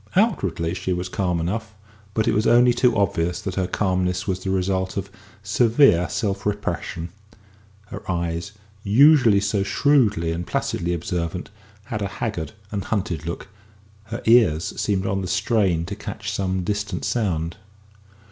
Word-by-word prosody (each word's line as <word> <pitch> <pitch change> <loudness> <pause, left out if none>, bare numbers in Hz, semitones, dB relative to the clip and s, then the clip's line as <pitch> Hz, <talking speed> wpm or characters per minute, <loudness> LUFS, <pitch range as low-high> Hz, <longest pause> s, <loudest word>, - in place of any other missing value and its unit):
Outwardly 95 - +1
she 90 0 -2
was 90 +1 -3
calm 90 -3 -1
enough, 110 +6 -3 0.4
but 110 - +1
it - - +3
was 105 +1 +2
only 120 +1 +6
too 120 -1 +2
obvious 90 -3 0
that 95 - -4
her 95 -1 -1
calmness 90 -1 0
was 95 -2 -1
the 95 - -4
result 95 0 -1
of - - -4 0.3
severe 115 - +4
self 100 -3 -2
repression; 100 -4 -3 0.8
her - - -7
eyes, 85 0 -2 0.3
usually 120 0 +6
so 100 0 0
shrewdly 105 - +2
and 85 +1 -4
placidly 85 +1 -1
observant, 85 +2 -3 0.3
had 110 -2 -5
a 100 - 0
haggard 100 -4 -4 0.2
and 100 -2 -3
hunted 85 -7 -2
look; 85 +3 -5 0.6
her 115 +2 -6
ears 110 -9 +4
seemed 95 -2 0
on 95 0 0
the 90 - -4
strain 95 -2 +1
to - - -5
catch - - -6
some 95 -1 -1
distant 100 -5 -2
sound. 85 -8 -1
95 Hz, 150 wpm, -23 LUFS, 90-110 Hz, 0.8 s, only